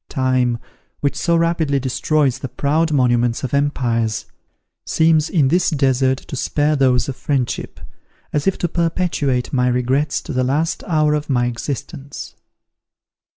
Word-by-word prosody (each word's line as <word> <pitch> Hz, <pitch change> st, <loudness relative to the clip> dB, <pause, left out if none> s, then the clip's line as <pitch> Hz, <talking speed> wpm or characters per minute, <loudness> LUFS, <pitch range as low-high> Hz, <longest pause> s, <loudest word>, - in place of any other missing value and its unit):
Time, 130 Hz, -3 st, +1 dB, 0.4 s
which 140 Hz, -, 0 dB
so 170 Hz, -, +1 dB
rapidly 165 Hz, -4 st, +1 dB
destroys 130 Hz, +1 st, 0 dB
the 135 Hz, -, -5 dB
proud 155 Hz, +6 st, 0 dB
monuments 120 Hz, -4 st, +2 dB
of 130 Hz, -, -4 dB
empires, 120 Hz, -6 st, 0 dB, 0.6 s
seems 160 Hz, -1 st, +2 dB
in 150 Hz, -8 st, +2 dB
this 175 Hz, +4 st, +2 dB
desert 130 Hz, -4 st, +2 dB
to 140 Hz, -, -8 dB
spare 150 Hz, +3 st, +1 dB
those 125 Hz, -3 st, +2 dB
of 135 Hz, -, -4 dB
friendship, 135 Hz, -3 st, -2 dB, 0.5 s
as 150 Hz, +2 st, 0 dB
if 195 Hz, -, +2 dB
to 175 Hz, -, -1 dB
perpetuate 165 Hz, -7 st, -1 dB
my 125 Hz, -1 st, +2 dB
regrets 125 Hz, +4 st, +1 dB
to 160 Hz, -, -7 dB
the 130 Hz, 0 st, +1 dB
last 150 Hz, +6 st, 0 dB
hour 155 Hz, -3 st, +2 dB
of 150 Hz, 0 st, -2 dB
my 125 Hz, -3 st, +2 dB
existence. 135 Hz, +3 st, -5 dB
140 Hz, 145 wpm, -19 LUFS, 125-155 Hz, 0.6 s, monuments